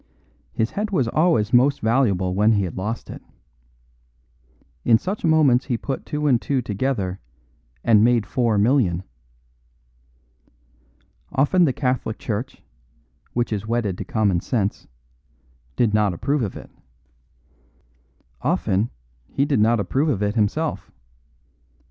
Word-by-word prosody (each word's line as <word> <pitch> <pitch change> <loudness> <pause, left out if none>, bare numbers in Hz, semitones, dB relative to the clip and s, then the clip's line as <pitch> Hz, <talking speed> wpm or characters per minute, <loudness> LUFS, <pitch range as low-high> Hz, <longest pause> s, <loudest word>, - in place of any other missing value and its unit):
His 110 0 -1
head 210 +1 -2
was 140 - +1
always 115 -6 +1
most 135 +3 +4
valuable 110 -6 +1
when 105 +4 +3
he 100 -2 +1
had 90 - -5
lost 105 +5 -4
it. - - -9 1.6
In 115 - +5
such 195 - -5
moments 155 -6 +4
he 120 -4 -1
put 135 +3 -5
two 150 -1 -2
and 125 -5 +3
two 140 -2 0
together 105 -4 -2 0.6
and 110 -2 +5
made 120 -2 +3
four 115 -2 0
million. 100 -6 +2 2.3
Often 145 +6 +3
the 140 - +2
Catholic 125 -4 -2
Church 115 +4 -5 0.7
(which 120 -2 -1
is 105 +1 -4
wedded 115 -5 -1
to - - -3
common 100 -5 +1
sense) 105 -1 -2 0.9
did 115 -4 +1
not 105 -4 +2
approve 140 - -1
of 105 -5 -3
it. - - -12 1.7
Often 100 +5 0 0.4
he 140 - 0
did 145 -5 +1
not 115 +2 +3
approve 135 - 0
of 105 -8 0
it 105 0 0
himself. 120 +9 -1
115 Hz, 130 wpm, -22 LUFS, 105-135 Hz, 2.3 s, In